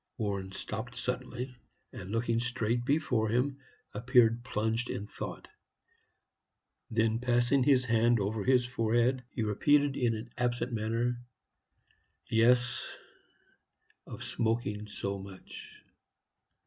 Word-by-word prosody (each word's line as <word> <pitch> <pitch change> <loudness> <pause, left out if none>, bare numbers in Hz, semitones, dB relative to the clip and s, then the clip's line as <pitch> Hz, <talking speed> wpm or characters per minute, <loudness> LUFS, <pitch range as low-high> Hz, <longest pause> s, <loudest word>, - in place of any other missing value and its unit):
Warren 100 -4 -2
stopped 110 +5 -6
suddenly, 125 0 -4 0.4
and, 95 - -8
looking 115 +1 0
straight 120 -1 -1
before 130 -6 +1
him, 130 +5 0 0.3
appeared 120 +1 +3
plunged 110 +2 -1
in 100 - -3
thought. - - -7 1.4
Then, 110 0 +1
passing 120 +2 +2
his 130 -1 +4
hand 115 0 +3
over 105 +1 -1
his 125 0 +4
forehead, 120 +2 +1
he 115 - -3
repeated, 145 +7 +3
in 120 -4 +1
an 115 +2 -7
absent 120 0 0
manner, 115 +2 -1 1.0
"Yes, 120 +1 +2 1.1
of - - -8
smoking 110 -2 -1
so 100 -1 -4
much. 95 -1 -11
120 Hz, 110 wpm, -31 LUFS, 110-125 Hz, 1.4 s, his